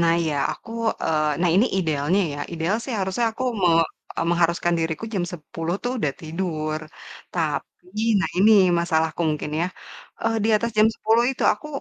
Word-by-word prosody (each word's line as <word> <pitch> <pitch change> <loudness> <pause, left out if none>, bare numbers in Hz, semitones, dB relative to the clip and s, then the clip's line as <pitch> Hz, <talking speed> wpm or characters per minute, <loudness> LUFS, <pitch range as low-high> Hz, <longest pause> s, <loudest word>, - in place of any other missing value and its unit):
Nah 165 -1 +4
iya 155 -3 -1 0.2
aku - - -12 0.3
eee, 155 -2 +1
nah 180 - +3
ini 205 +7 +5
idealnya 160 +2 +1
ya, - - -7
ideal 170 +5 0
sih 260 - -5
harusnya 190 +5 0
aku 255 - -4 0.2
me 180 - +5 0.5
eee, - - 0
mengharuskan 170 0 +2
diriku 165 +5 -2
jam 180 - 0
10.00 165 +1 -4
tuh 245 +1 -1
udah 145 -6 0
tidur. 155 -2 -3 0.5
Tapi 175 +4 -3 0.2
nah - - 0
ini 205 +4 +6 0.3
masalahku 160 -1 0
mungkin 150 0 -3
ya. 175 - +1 0.6
Eee, 225 0 +1
di - - +2
atas 235 +2 -1
jam 215 - +7
10.00 225 +3 +2
itu 265 - -5
aku 210 +8 -8
170 Hz, 175 wpm, -23 LUFS, 160-205 Hz, 0.6 s, jam